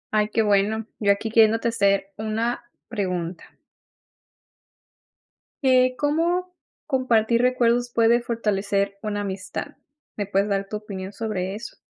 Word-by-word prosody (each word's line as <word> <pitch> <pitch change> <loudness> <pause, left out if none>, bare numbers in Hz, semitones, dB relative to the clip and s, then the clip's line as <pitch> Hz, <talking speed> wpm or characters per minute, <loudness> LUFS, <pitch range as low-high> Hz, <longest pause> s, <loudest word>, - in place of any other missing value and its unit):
Ay, 210 0 +2
qué 225 +1 +1
bueno, 210 +2 +2
yo 200 -2 +3
aquí 205 +3 -1
queriéndote 225 0 +4
hacer 200 -3 +1
una 220 +3 -2 0.2
pregunta. 180 -5 -4 2.1
Eh, 255 -1 +4
¿cómo 340 +5 0 0.3
compartir 235 -4 +2
recuerdos 245 -1 +2
puede 230 +1 +5
fortalecer 200 -4 -1
una 210 -1 -2
amistad? 195 +8 -5 0.4
¿Me 205 - -1
puedes 200 +1 0
dar 195 0 -1
tu 210 - -5
opinión 200 -2 -6
sobre 200 -3 -3
eso? 220 +1 -8
215 Hz, 120 wpm, -24 LUFS, 200-235 Hz, 2.1 s, puede